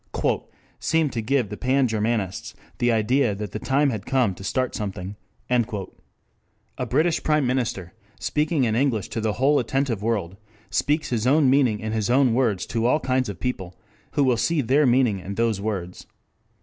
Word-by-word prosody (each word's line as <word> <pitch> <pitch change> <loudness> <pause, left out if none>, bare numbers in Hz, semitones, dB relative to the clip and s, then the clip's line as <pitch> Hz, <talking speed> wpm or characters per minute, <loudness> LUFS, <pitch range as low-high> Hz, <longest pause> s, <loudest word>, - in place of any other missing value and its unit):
] - - -34 0.3
"seemed 160 -3 +1
to 115 - -1
give 125 -1 0
the 105 - -5
Pan 130 +1 +2
Germanists 110 -3 -2 0.2
the 120 0 +3
idea 115 +1 +2
that 105 -1 -5
the 110 - -4
time 140 +3 +2
had 105 -5 -4
come 125 -7 +2
to 95 - -11
start 130 +5 -1
something." 100 -1 -5 0.3
A 115 -6 -5
British 165 +1 +2
Prime 150 -2 +2
Minister, 120 -8 -2 0.3
speaking 150 -1 0
in 110 -3 +1
English 120 -6 0
to 115 - -3
the 110 -1 0
whole 140 +5 +3
attentive 135 -6 -1
world, 105 -5 -2 0.3
speaks 150 +2 0
his 115 0 0
own 140 -1 +4
meaning 130 -6 +3
in 110 +1 -4
his 110 0 -1
own 130 -1 +4
words 115 -7 +1
to 115 0 -1
all 150 - +3
kinds 130 -3 0
of 100 - -7
people 95 -9 -4 0.4
who 145 - +2
will 125 -3 +3
see 150 +7 +1
their 135 +4 +3
meaning 120 -5 +3
in 95 +2 -6
those 115 -3 0
words. 95 -4 -4
120 Hz, 180 wpm, -24 LUFS, 105-135 Hz, 0.4 s, own